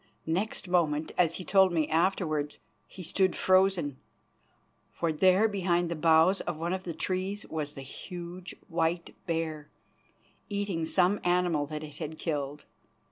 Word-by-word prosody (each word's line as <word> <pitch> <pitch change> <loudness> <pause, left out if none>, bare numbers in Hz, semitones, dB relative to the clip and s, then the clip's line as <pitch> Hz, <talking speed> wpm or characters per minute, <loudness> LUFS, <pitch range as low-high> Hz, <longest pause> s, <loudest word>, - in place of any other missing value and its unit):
Next 190 +5 -2
moment, 160 -4 +1
as 170 -2 +2
he 185 - -7
told 190 -1 +5
me 160 -3 +1
afterwards, 160 -3 0 0.3
he 185 - -10
stood 185 +2 +1
frozen, 185 -7 +3 0.9
for 165 -2 -1
there 185 +6 +5
behind 175 -4 0
the - - -1
boughs 165 +4 +4
of 175 -3 -4
one 170 +3 -2
of 185 0 -4
the 170 - -3
trees 190 +3 -2
was 150 -2 -4
the 135 - -7
huge 175 +4 -8
white 165 +1 -1
bear, 160 -3 -2 0.8
eating 200 -5 -2
some 185 +4 +3
animal 175 -4 +2
that 155 +1 -5
it 150 -1 -9
had 160 -1 -5
killed. 145 -3 -3
170 Hz, 145 wpm, -29 LUFS, 155-185 Hz, 0.9 s, told